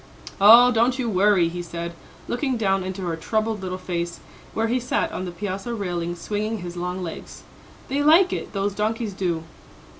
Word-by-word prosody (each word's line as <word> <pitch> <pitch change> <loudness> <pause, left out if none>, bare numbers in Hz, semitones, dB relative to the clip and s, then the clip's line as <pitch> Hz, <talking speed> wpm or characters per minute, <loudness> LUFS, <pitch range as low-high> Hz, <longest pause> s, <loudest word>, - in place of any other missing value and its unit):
"Oh, 235 +5 +9
don't 240 +2 +2
you 255 -3 -1
worry," 195 -3 +3
he 175 +1 -4
said, 170 0 -5 0.3
looking 260 0 -1
down 195 -3 +1
into 190 +1 -5
her 170 -2 -2
troubled 215 +5 -1
little 185 -1 -4
face 175 -2 -4 0.4
where 225 - +1
he 240 +3 +1
sat 245 - -1
on 185 - -4
the 180 - -5
piazza 195 +5 -4
railing 175 -4 -3
swinging 210 +5 -3
his 175 0 -6
long 180 +1 -3
legs, 165 - -8 0.4
"they 275 +2 0
like 330 +6 +5
it, - - -4
those 200 0 -1
donkeys 215 +1 -2
do!" 175 -4 -2
195 Hz, 180 wpm, -23 LUFS, 175-225 Hz, 0.4 s, Oh